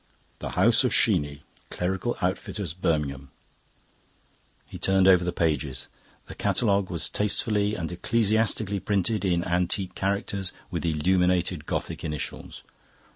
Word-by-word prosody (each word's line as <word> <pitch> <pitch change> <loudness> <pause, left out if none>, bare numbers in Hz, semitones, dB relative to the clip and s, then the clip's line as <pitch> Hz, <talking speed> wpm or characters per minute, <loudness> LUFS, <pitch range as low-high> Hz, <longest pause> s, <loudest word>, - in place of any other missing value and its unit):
"The - - -4
House - - +5
of - - +1
Sheeny, 70 -1 +2 0.3
Clerical 95 +6 -2
Outfitters, 90 -1 -2
Birmingham." 75 -6 -1 1.4
He - - -10
turned 95 0 +3
over 90 -2 +6
the 90 - -1
pages. 75 -6 -1 0.4
The - - -9
catalogue 100 -4 +1
was 85 -2 -1
tastefully 105 0 0
and 80 -1 -4
ecclesiastically 110 +1 +1
printed 100 +1 0
in 85 -3 +1
antique 90 +1 -1
characters 100 0 -2 0.2
with 85 -1 -2
illuminated 90 +1 +1
Gothic - - -3
initials. 75 -3 -5
90 Hz, 120 wpm, -26 LUFS, 85-100 Hz, 1.4 s, over